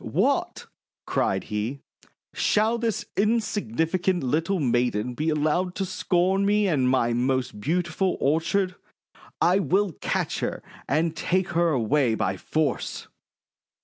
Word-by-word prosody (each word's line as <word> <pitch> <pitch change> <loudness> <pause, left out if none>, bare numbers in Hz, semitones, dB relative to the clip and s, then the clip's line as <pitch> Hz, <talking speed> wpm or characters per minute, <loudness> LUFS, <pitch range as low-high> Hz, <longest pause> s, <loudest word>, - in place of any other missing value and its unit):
"What!' - - 0 0.4
cried - - 0
he, 110 +6 -4 0.5
"shall 220 +3 +2
this 230 -2 -1
insignificant 190 - 0
little 165 +8 0
maiden 120 -3 0
be 155 +6 -1
allowed 155 +4 0
to 195 - -1
scorn 185 +1 +1
me 205 +1 +3
and 135 -8 +2
my 120 -2 +2
most 125 -2 -1
beautiful 175 - 0
orchard! 170 +6 +1 0.7
I 180 +3 +4
will 195 0 +1
catch - - -1
her - - -3 0.3
and 160 +3 +1
take 185 +3 0
her 170 0 +2
away 130 -2 +2
by 100 -4 -1
force!' 155 +10 -2
165 Hz, 120 wpm, -25 LUFS, 130-190 Hz, 0.7 s, I